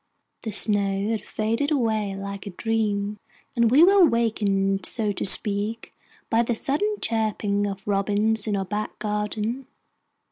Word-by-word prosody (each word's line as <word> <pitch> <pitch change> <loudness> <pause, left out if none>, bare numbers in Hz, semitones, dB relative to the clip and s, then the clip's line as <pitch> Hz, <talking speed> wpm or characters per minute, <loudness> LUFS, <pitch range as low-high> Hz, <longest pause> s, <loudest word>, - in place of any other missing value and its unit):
The 225 - -5
snow 200 -1 +3
had 225 -2 -1
faded 230 +6 -2
away 220 -8 0
like 200 0 -7
a - - -3
dream, 210 0 -2 0.4
and 235 -1 +3
we 280 +7 +6
were 395 +2 +6
awakened, 205 - +1
so 215 -3 -1
to 200 - -4
speak, 210 +3 +2 0.3
by 225 0 +2
the 235 0 -1
sudden 390 - -1
chirping 210 -2 -1
of 195 0 -7
robins 205 +2 0
in 205 -2 0
our 195 - -2
back 210 +2 -4
garden. 215 +4 -3
215 Hz, 145 wpm, -24 LUFS, 200-230 Hz, 0.4 s, we